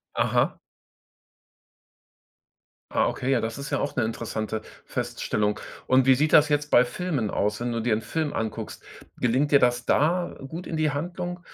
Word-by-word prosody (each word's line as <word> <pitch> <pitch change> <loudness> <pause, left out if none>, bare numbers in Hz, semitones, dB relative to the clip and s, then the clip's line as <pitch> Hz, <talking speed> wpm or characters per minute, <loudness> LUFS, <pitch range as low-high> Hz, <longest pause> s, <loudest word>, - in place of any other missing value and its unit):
Aha. - - +1 2.3
Ah, - - +2
okay, 130 - -2
ja, 130 -3 +3
das 115 0 -3
ist 140 +1 -6
ja 145 - 0
auch 145 - -3
'ne - - +2
interessante 110 -1 -3 0.2
Feststellung. 105 0 -1 0.3
Und 130 0 +4
wie 130 - +7
sieht 150 +4 +1
das 150 0 +6
jetzt 145 0 +1
bei 125 - +6
Filmen 135 - -2
aus, 105 +2 -1
wenn 120 0 -2
du 115 - -1
dir 115 -1 +2
'n 110 - -2
Film 160 +2 -2
anguckst? 110 -1 -4 0.4
Gelingt 130 +5 +1
dir 140 - +7
das 120 -1 +2
da, 175 +4 +2
gut 165 +5 -7
in 165 - -3
die 155 -1 +2
Handlung 175 +4 -4
135 Hz, 170 wpm, -26 LUFS, 115-155 Hz, 2.3 s, wie